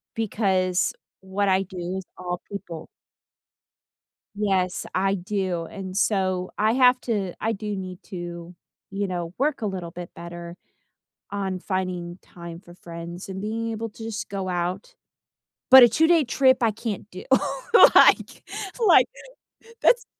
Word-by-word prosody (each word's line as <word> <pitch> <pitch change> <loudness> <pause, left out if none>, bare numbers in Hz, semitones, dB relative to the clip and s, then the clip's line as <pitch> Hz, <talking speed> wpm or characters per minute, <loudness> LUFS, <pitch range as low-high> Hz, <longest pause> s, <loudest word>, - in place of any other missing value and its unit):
because 190 -4 +1 0.3
what 190 +2 -1
I 190 +1 +3
do 185 -1 -5
is 190 - -6
all 180 -1 -4
people. 170 -5 -7 1.5
Yes, 190 -3 0
I 195 +1 +2
do 185 -2 -2
and 185 +2 -8
so, 185 -3 0
I 215 +2 +2
have 250 0 +5
to 200 -6 -2
I 225 - +1
do 210 -1 -4
need 185 -1 -7
to, 175 -1 -8 0.3
you 200 0 -2
know, 175 -2 -4
work 285 +1 0
a - - -1
little 185 -4 -4
bit 175 0 -8
better 170 0 -8 0.8
on 195 -2 -3
finding 185 -2 -3
time 170 -1 -10
for 175 -2 -15
friends 170 +1 -9
and 190 0 -5
being 230 +2 -3
able 225 +1 -4
to 220 - -12
just 225 -1 -5
go 195 -2 -4
out, 180 - -3 0.8
but 260 0 +11
a 240 - +8
two-day 320 +6 +4
trip, 260 0 +3
I 225 - +4
can't 215 -2 -5
do. - - -8 0.7
like - - +5 0.4
like, - - +6 0.7
that's 480 -1 +4
190 Hz, 145 wpm, -24 LUFS, 180-215 Hz, 1.5 s, but